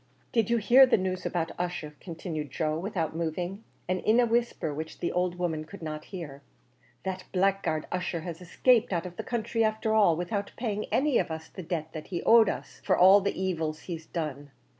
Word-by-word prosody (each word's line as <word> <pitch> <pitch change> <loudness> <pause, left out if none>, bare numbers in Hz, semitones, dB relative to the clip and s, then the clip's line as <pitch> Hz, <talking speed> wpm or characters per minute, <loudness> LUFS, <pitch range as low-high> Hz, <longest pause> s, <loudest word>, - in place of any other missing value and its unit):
"Did 230 -3 +2
you 235 - +3
hear 245 +5 +7
the 250 - +4
news 185 -1 -2
about 165 -2 -1
Ussher?" 175 -4 -3
continued 165 -4 -5
Joe 155 +2 -1
without 170 -4 -2
moving, 175 +5 -3 0.2
and 185 +1 0
in 220 +5 +3
a 245 - +5
whisper 235 -9 0
which 160 +2 -6
the 170 - -2
old 180 0 0
woman 170 -3 -2
could 170 +3 -11
not 155 -1 -5
hear. 155 -8 -8 0.6
"That 190 -1 -4
blackguard 185 -4 +1
Ussher 180 -2 -2
has 170 +1 -7
escaped 235 +6 +3
out 170 0 -1
of 180 -1 -7
the - - -3
counthry 230 -1 -1
afther 220 0 +1
all, 205 -7 +5
without 200 +4 -3
paying 215 -3 -2
any 280 -1 +3
of - - -1
us 160 0 -6
the 185 - -8
debt 160 -2 -4
that 155 - -7
he 175 -3 -4
owed 225 -3 +7
us, - - -6
for - - +2
all 190 +3 +8
the 200 -1 -2
evils 160 -4 -2
he's 165 -3 -7
done. 145 -4 -4
180 Hz, 205 wpm, -28 LUFS, 160-205 Hz, 0.6 s, all